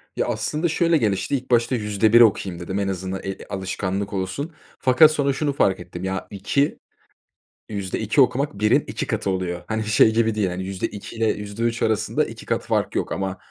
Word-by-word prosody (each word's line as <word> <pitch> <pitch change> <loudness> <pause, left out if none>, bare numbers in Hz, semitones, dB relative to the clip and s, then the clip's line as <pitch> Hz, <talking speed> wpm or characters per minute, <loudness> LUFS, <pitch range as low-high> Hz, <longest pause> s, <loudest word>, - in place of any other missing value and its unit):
Ya, - - 0
aslında 155 +3 -1
şöyle 165 0 +2
gelişti, 110 +2 0
ilk 130 -1 -5
başta 120 +2 +3
%1 110 +1 +4
okuyayım 95 -5 +3
dedim. 95 +3 -3
En 100 - -1
azından, 95 0 -3
eee, 95 0 -4
alışkanlık 95 +1 -3
olsun. 100 - -3 0.3
Fakat 150 +4 +6
sonra 140 -2 +1
şunu 145 0 -1
fark 95 -9 +2
ettim 90 +1 -8
ya, 95 0 -3
2, 125 +9 0 0.9
%2 105 +5 0
okumak 130 -4 +1
1'in 105 0 +3
2 - - -4
katı 100 - -1
oluyor. 90 -2 -2
Hani, 110 0 -2
şey 110 +1 +4
gibi 115 -1 +2
değil. 105 -3 +1
Hani, 90 +1 -4
%2 95 +3 -5
ile 115 -1 +1
%3 115 +3 -3
arasında 110 -1 +1
2 - - -10
kat - - 0
fark - - 0
yok - - -1
ama 95 -1 -2
105 Hz, 180 wpm, -23 LUFS, 95-120 Hz, 0.9 s, Fakat